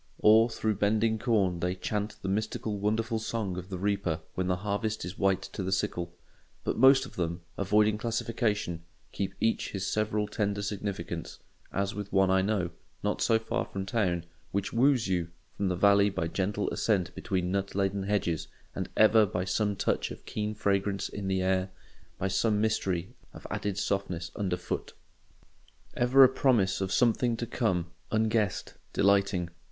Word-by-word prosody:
Or 110 +2 +6
through 110 -2 -1
bending 110 +2 +2
corn 100 -7 +1
they 90 +2 -1
chant 105 +2 -3
the - - -3
mystical 105 +1 -2
wonderful 110 +2 0
song 110 -4 -3
of 90 +1 -7
the 95 - -4
reaper 95 -4 -1
when 90 0 -1
the 90 - +2
harvest 105 -1 -1
is 90 +2 -6
white 95 -1 +1
to - - -4
the 95 0 -2
sickle. 85 -2 -1 0.5
But - - -1
most 135 +2 +6
of - - -13
them, 85 0 -2
avoiding 105 +2 +2
classification, 110 -6 -1 0.3
keep 100 - -3
each 115 0 0
his 100 -1 -2
several 105 0 0
tender 100 -1 -1
significance; 100 -1 -4 0.3
as 100 +1 -1
with 100 -1 -6
one 95 -1 +4
I 95 0 +4
know, 95 -3 0 0.3
not - - -1
so 115 - +4
far 115 +2 -2
from 95 0 -5
town, 95 -5 0 0.3
which 100 0 -2
woos 125 -1 +3
you 90 -3 0 0.3
from 100 - -1
the 90 - 0
valley 100 +2 +5
by 85 -4 -2
gentle 95 +4 -1
ascent 95 -5 0
between 90 -3 -2
nut 100 0 -2
laden 100 0 0
hedges, 85 -5 -1 0.3
and - - -4
ever 110 0 +6
by 90 -1 -2
some 105 +2 0
touch 100 - 0
of - - -10
keen 105 0 -3
fragrance 100 -1 0
in 100 -1 -5
the 95 -1 +1
air, 95 0 +1 0.5
by 95 - -1
some 105 +2 +1
mystery 95 -5 0 0.2
of - - -11
added 100 -2 -2
softness 90 -5 -2
under 95 -4 -1
foot—ever 125 +7 -1
a - - +10
promise 120 -8 +2
of 95 0 -1
something 120 +1 +2
to 120 - -3
come, 95 -8 -1 0.2
unguessed, 110 -3 0 0.2
delighting. 100 -3 +2
100 Hz, 170 wpm, -29 LUFS, 95-110 Hz, 0.5 s, a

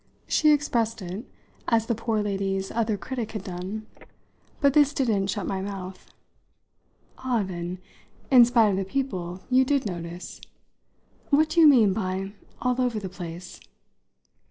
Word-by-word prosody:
She 305 -1 +4
expressed 230 -7 0
it 185 +7 -6 0.4
as 225 -2 +2
the 235 - 0
poor 225 -1 -1
lady's 195 -1 -2
other 220 -2 0
critic 225 +5 -5
had 215 -3 -5
done, 190 +3 -6 0.7
but 280 -2 +3
this 290 -1 +4
didn't 215 -7 +1
shut 200 -1 -2
my 190 -1 -2
mouth. 190 -1 -7 1.1
"Ah, 250 -4 0
then, 175 -1 -5 0.5
in 250 -2 +9
spite 235 -2 +4
of 190 - -1
the 195 - 0
people, 190 -6 -3
you 260 +1 +5
did 275 0 +1
notice. 175 -2 -6 0.9
What 310 +2 +4
do 335 +2 +3
you 315 - +9
mean 230 -9 +6
by 190 -1 -3 0.3
'all 250 0 +1
over 245 -3 0
the 195 -2 -6
place'?" 175 0 -8
210 Hz, 150 wpm, -26 LUFS, 190-250 Hz, 1.1 s, in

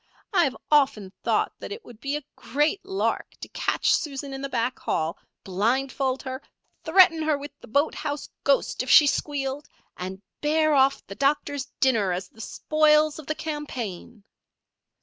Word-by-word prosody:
I 355 -3 +5
have 265 - -2
often 265 -10 +3
thought - - +1
that - - -7
it 430 +2 -7
would 235 -3 -13
be 275 +4 -2
a 295 - -9
great 300 - 0
lark 385 0 -2
to - - -7
catch - - +1
Susan 280 -4 -2
in 270 - -5
the 275 - -4
back 245 0 -1
hall, 160 +1 -1 0.2
blindfold 260 +7 0
her, 260 0 -5 0.4
threaten 330 -1 +6
her 310 -2 +1
with 285 +1 -8
the - - -14
boathouse 290 +3 -1 0.2
ghost 280 -3 +2
if 255 - -5
she 300 - +9
squealed, 285 -1 -2 0.3
and 190 +2 -7 0.2
bear 310 +1 +3
off 270 -1 +3
the - - -8
doctor's 280 +2 0
dinner 225 -8 +3
as 180 +2 -4
the 225 - -13
spoils 305 +4 +2
of 310 - -11
the 310 - -1
campaign." 245 - -6
275 Hz, 165 wpm, -25 LUFS, 245-300 Hz, 0.4 s, she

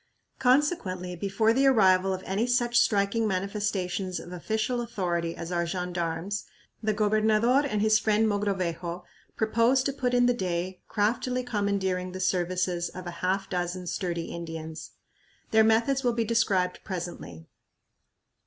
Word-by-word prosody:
Consequently, 250 - +1
before 200 +5 +1
the 270 +3 +3
arrival 190 -6 +4
of 190 0 -3
any 205 +5 0
such 240 -1 +1
striking 210 +1 +2
manifestations 190 -2 -2
of 175 - -10
official 220 +7 -1
authority 175 -7 -2
as 170 +1 -6
our 170 -1 +1
gendarmes, 180 +2 -3 0.4
the 215 -1 +1
gobernador 215 +4 +3
and 210 -5 0
his 215 0 +4
friend 215 0 +2
Mogrovejo 185 -4 -2 0.3
proposed 230 +4 +2
to 275 - 0
put 250 -2 -1
in 245 0 +4
the 245 - +4
day 185 -3 -3
craftily 245 +4 0
commandeering 200 -5 -1
the 185 - -5
services 180 -1 0
of 185 - -9
a 175 - -4
half 195 +1 0
dozen 180 0 -3
sturdy 170 -1 -3
Indians. 165 -1 -7 0.6
Their 220 0 +6
methods 230 +5 +2
will 245 -1 +2
be 230 -1 0
described 200 -5 +1
presently. 165 - -6
195 Hz, 140 wpm, -27 LUFS, 180-225 Hz, 0.6 s, Their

